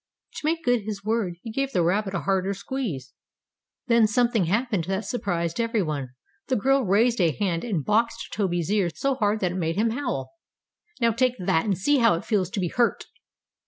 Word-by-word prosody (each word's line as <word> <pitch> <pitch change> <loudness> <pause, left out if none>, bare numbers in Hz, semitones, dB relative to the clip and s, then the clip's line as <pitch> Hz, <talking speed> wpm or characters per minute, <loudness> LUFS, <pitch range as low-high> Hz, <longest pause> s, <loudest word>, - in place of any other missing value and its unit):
To - - -6
make 330 +1 0
good 245 -2 +3
his 205 -1 -6
word 215 -5 0
he 225 - -6
gave 275 +3 -2
the 180 - +2
rabbit 195 +3 0
a - - -1
harder 195 0 0
squeeze. 190 - -4 0.7
Then 235 -3 +4
something 230 -2 +2
happened 205 -1 0
that 190 +3 -2
surprised 170 -7 -2
every 230 -3 0
one. 140 -5 -4 0.3
The 260 - +1
girl 270 +5 +3
raised 220 +3 +3
a 170 - +4
hand, 170 -1 -1
and 190 - -2
boxed 230 +2 0
Toby's 175 -3 -1
ears 195 -6 0
so 275 0 +1
hard 215 -4 0
that 180 -2 +1
it 180 - -4
made 165 -1 -1
him 220 +3 +1
howl. 240 - -3 0.7
"Now, 235 -2 +3
take 250 +2 +1
that, 175 -2 +1
and 200 -4 0
see 285 +9 +2
how 230 -7 +5
it 165 - -6
feels 195 -6 +1
to 200 - -3
be 180 -2 0
hurt!" 240 +4 +1
205 Hz, 200 wpm, -25 LUFS, 180-235 Hz, 0.7 s, how